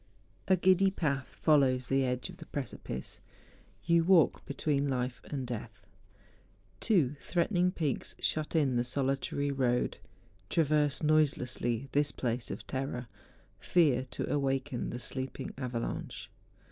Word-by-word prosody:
A 190 - +5
GIDDY 190 +1 +4
path 140 -8 -1
follows 130 -5 +3
the 135 +1 +2
edge 125 -1 -1
of - - -13
the - - -11
precipice; 115 - -6 0.6
you 170 0 +4
walk 175 -3 +4
between 140 0 0
life 125 -2 -2
and 135 -3 -4
death. 110 -4 -7 0.9
Two 160 - +2
threatening 180 +1 +1
peaks 155 -7 -2
shut 155 +1 -1
in 135 -6 +3
the 120 - +2
solitary 135 +2 -1
road. 125 -3 0 0.5
Traverse 150 -3 +2
noiselessly 135 -5 +1
this 145 0 +2
place 120 -1 -2
of - - -6
terror; 130 -2 -3 0.5
fear 145 -8 +3
to - - -5
awaken 135 -2 -1
the 120 - -4
sleeping 130 +1 -4
avalanche. 125 -3 -4
140 Hz, 125 wpm, -31 LUFS, 125-155 Hz, 0.9 s, A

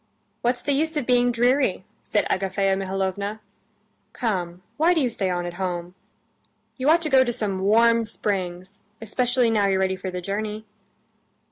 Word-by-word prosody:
"What's 245 +1 0
the 285 - 0
use 315 +3 0
of 285 - -1
being 245 0 +3
dreary?" 245 -4 +1 0.2
said - - 0
Agafea 195 0 0
Mihalovna. 195 +2 -3 0.7
"Come, 180 -6 -3
why 335 +3 +4
do - - +2
you 255 -5 +1
stay 195 -4 -2
on 175 -1 -2
at 175 - -5
home? 175 -1 -3 0.8
You 265 +2 0
ought 335 +1 +4
to 310 - -1
go 265 -1 +6
to 240 - -1
some 210 -5 -2
warm 230 +4 +4
springs, 190 -3 -3 0.2
especially 245 +2 +1
now 210 -3 +2
you're 195 -1 +2
ready 190 0 +1
for 185 0 -5
the 180 0 -4
journey." 210 +3 -4
210 Hz, 165 wpm, -24 LUFS, 190-245 Hz, 0.8 s, go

